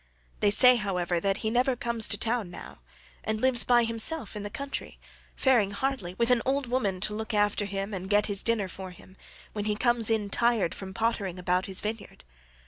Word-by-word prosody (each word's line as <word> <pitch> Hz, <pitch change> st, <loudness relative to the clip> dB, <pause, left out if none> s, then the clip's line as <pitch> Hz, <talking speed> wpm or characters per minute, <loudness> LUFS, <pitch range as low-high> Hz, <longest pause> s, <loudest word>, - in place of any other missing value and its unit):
They 205 Hz, -, +3 dB
say, 250 Hz, +4 st, +6 dB
however, 180 Hz, -5 st, -1 dB
that 195 Hz, +2 st, 0 dB
he 220 Hz, -, +1 dB
never 250 Hz, +2 st, +2 dB
comes 235 Hz, -2 st, +1 dB
to 205 Hz, -, -1 dB
town 225 Hz, -3 st, -1 dB
now, -, -, -11 dB, 0.4 s
and 220 Hz, 0 st, -1 dB
lives 255 Hz, 0 st, +4 dB
by 240 Hz, -1 st, +4 dB
himself 230 Hz, +3 st, -1 dB
in 210 Hz, -, -4 dB
the 205 Hz, -, -5 dB
country, 280 Hz, +6 st, -6 dB, 0.4 s
faring 245 Hz, -7 st, +3 dB
hardly, 205 Hz, -4 st, -3 dB
with 235 Hz, +4 st, +1 dB
an 245 Hz, -2 st, +3 dB
old 275 Hz, +1 st, 0 dB
woman 235 Hz, -7 st, -1 dB
to 210 Hz, -, 0 dB
look 220 Hz, +1 st, -4 dB
after 205 Hz, 0 st, +1 dB
him 195 Hz, +1 st, -4 dB
and 190 Hz, 0 st, -5 dB
get 205 Hz, 0 st, +3 dB
his 200 Hz, -2 st, +2 dB
dinner 230 Hz, -4 st, +1 dB
for 185 Hz, +1 st, -8 dB
him, 185 Hz, +1 st, -16 dB, 0.4 s
when 210 Hz, -1 st, -4 dB
he 210 Hz, -1 st, 0 dB
comes 240 Hz, 0 st, +2 dB
in 215 Hz, -3 st, 0 dB
tired 230 Hz, -8 st, +2 dB
from 190 Hz, -1 st, -8 dB
pottering 220 Hz, -5 st, -1 dB
about 180 Hz, +1 st, 0 dB
his 190 Hz, -1 st, +2 dB
vineyard. 215 Hz, 0 st, -6 dB
215 Hz, 205 wpm, -27 LUFS, 195-235 Hz, 0.4 s, say